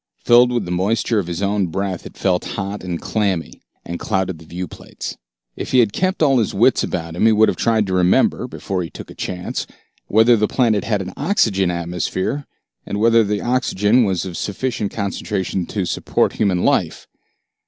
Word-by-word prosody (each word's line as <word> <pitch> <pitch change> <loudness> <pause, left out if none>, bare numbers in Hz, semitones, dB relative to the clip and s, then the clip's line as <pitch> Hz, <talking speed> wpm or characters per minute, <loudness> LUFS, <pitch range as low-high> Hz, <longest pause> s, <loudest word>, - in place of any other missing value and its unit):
Filled 120 +1 +5
with 120 -5 -1
the 90 - -5
moisture 105 +5 +1
of 90 - -3
his 85 +3 -3
own 100 -1 +1
breath, 95 +1 -3
it - - -15
felt 90 -2 +1
hot 100 0 -4
and 90 -2 -3
clammy, 100 -6 -2 0.2
and 85 0 -5
clouded 95 -5 -1
the 80 - -14
viewplates. 90 0 -7 0.4
If - - -6
he - - +5
had 115 -4 +4
kept 185 -3 0
all 135 -4 +4
his 110 - -1
wits - - +4
about 85 0 -4
him 110 - +3
he - - +6
would 110 0 +5
have - - -1
tried 110 -2 +2
to 95 - -3
remember, 90 0 +2
before 95 -2 -4
he 85 - -5
took - - -10
a - - -9
chance, 90 -1 -4 0.4
whether 110 +3 +5
the 105 -1 +1
planet 115 -6 +1
had 105 -3 0
an 90 0 -8
oxygen 110 - +1
atmosphere, 90 - -2 0.4
and 100 - -4
whether 115 +1 +5
the 105 0 -1
oxygen 120 -2 +2
was 95 -5 0
of 90 -2 -6
sufficient 105 0 -2
concentration 100 -3 -2
to 100 -4 -2
support - - 0
human 95 -4 +1
life. - - +1
100 Hz, 190 wpm, -20 LUFS, 90-115 Hz, 0.4 s, he